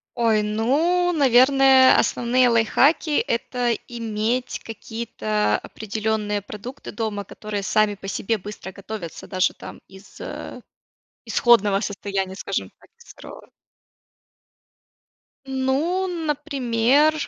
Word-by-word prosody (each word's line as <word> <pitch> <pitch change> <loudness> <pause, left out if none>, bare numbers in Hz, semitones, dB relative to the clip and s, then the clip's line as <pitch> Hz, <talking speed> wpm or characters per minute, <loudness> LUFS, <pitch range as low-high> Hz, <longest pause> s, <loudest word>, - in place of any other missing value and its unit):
Ой, 225 -3 +2
ну 295 +13 +1
наверное, 265 -1 +6
основные 245 +1 +2
лайфхаки, 275 +7 +3
это 240 +1 -1
иметь 230 +1 -2
какие-то 110 - -2
определенные 215 -1 -3
продукты 215 +6 -9
дома, 210 -2 -3
которые 210 0 -6
сами 210 +2 +2
по 195 - -10
себе 220 +3 -1
быстро 205 -1 -9
готовятся 195 -3 -8
даже 185 -1 +1
там - - -11
из, 190 +2 -16
э, - - -7 0.6
исходного 210 -5 +3
состояния 195 -2 -3
скажем 195 - -4
так - - -22
из 475 - -15
сырого. - - -13 2.0
Ну, 270 +8 0
например, 295 -4 +1
230 Hz, 100 wpm, -22 LUFS, 205-265 Hz, 2.0 s, наверное